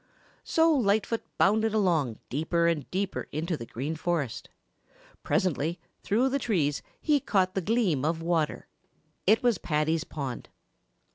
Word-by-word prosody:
So 325 0 +3
Lightfoot 220 -3 +1 0.2
bounded 220 +2 +3
along 165 - +1
deeper 160 +5 +1
and 160 -5 -1
deeper 195 +1 -2
into 165 +3 -2
the 115 -6 -8
Green 140 +7 -4
Forest. 160 -6 -2 0.7
Presently 170 -1 0 0.2
through 235 +6 +2
the 275 +1 0
trees 155 - 0 0.2
he 300 -2 +2
caught 190 -6 +1
the 190 - -1
gleam 195 - +1
of 160 +2 0
water. 165 -2 -1 0.6
It 220 +4 +5
was 235 -7 +3
Paddy's 155 +1 0
pond. 135 -5 -6
175 Hz, 135 wpm, -28 LUFS, 155-215 Hz, 0.7 s, It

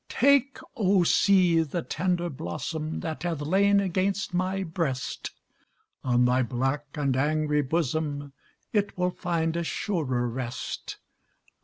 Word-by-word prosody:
Take, 280 +1 +3 0.2
O, 195 -4 +3
sea! 180 -2 +4
the 160 +2 -3
tender 175 +1 -1
blossom 155 - -4
That 160 -1 -4
hath 165 -4 -2
lain 200 +6 +3
against 195 0 0
my 185 +2 0
breast; 160 -7 -3 0.7
On 125 -1 +3
thy 125 +1 +3
black 135 +4 -1
and 140 -3 0
angry 150 +2 +1
bosom 145 -1 -2 0.4
It 205 -3 0
will 180 0 +1
find 170 -2 -1
a 170 - 0
surer 145 - -1
rest. 125 +1 -5
160 Hz, 125 wpm, -27 LUFS, 140-185 Hz, 0.7 s, sea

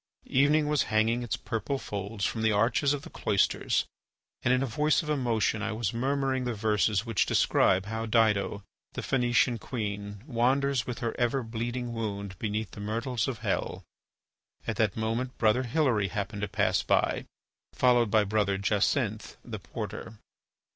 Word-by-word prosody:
Evening 150 +3 +3
was 150 -2 +2
hanging 110 +3 +2
its 120 - -2
purple 115 +5 -3
folds 100 -3 -4
from 110 - -2
the 110 0 +3
arches 115 +7 +2
of 145 -1 -2
the - - -9
cloisters - - +1 0.6
and 125 - +2
in 125 +1 +3
a - - +1
voice 150 +7 +1
of 150 - -3
emotion 115 -6 +1
I 110 +1 -2
was 110 -2 -2
murmuring 135 +1 0
the 120 -2 -2
verses 105 0 +1
which 115 -4 +1
describe 95 +1 +3
how 110 +2 -3
Dido, 105 -3 +2 0.3
the - - -5
Phœnician 120 -2 +2
queen, 105 -3 -5
wanders 130 0 +1
with 125 +1 -5
her 115 -2 -2
ever 125 +2 +1
bleeding 120 +2 -4
wound 100 -4 -4
beneath 110 0 -2
the - - -10
myrtles 115 +3 -1
of 130 -4 -4
hell. - - -1 0.8
At 110 -3 -3
that 110 -2 +1
moment 115 +3 -2
Brother 110 +3 +3
Hilary 120 -5 +1
happened 100 +2 -4
to 100 - -1
pass 100 0 +1
by, - - +1 0.5
followed 120 -3 +3
by 110 0 +4
Brother 100 -1 +1
Jacinth, 100 -1 0
the - - -6
porter. 115 - -7
115 Hz, 160 wpm, -28 LUFS, 105-125 Hz, 0.8 s, by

